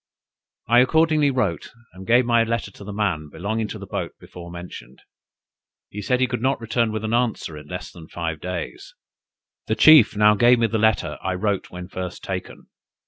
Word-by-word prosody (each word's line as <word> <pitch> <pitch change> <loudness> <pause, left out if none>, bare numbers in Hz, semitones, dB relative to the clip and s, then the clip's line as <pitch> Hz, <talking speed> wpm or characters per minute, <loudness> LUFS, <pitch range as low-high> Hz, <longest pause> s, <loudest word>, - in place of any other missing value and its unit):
I 120 +2 +5
accordingly 155 +2 +3
wrote, 105 - -1 0.2
and 95 +1 -11
gave 120 +2 +4
my 120 -1 +3
letter 115 -2 -3
to 100 - -13
the 105 - -7
man 95 -8 -2
belonging 105 +6 -3
to - - -7
the - - -9
boat - - -4
before 85 -1 -11
mentioned. 85 -8 -10 0.9
He 105 - -6
said 125 +5 0
he 130 - +3
could 125 -2 -4
not 135 +2 +1
return 115 0 0
with 110 0 -4
an 110 +1 -2
answer 120 -9 -1
in 75 0 -11
less 90 +2 -7
than 85 -3 -13
five 80 -3 -4
days. 90 -2 -6 0.7
The 110 - 0
chief 145 -3 +7
now 105 0 +6
gave 120 +3 +5
me 115 - +2
the 110 0 -1
letter 110 0 +1
I 95 0 -2
wrote 100 +1 -2
when 90 0 -8
first 95 -1 -6
taken. - - -6
105 Hz, 195 wpm, -22 LUFS, 90-120 Hz, 0.9 s, chief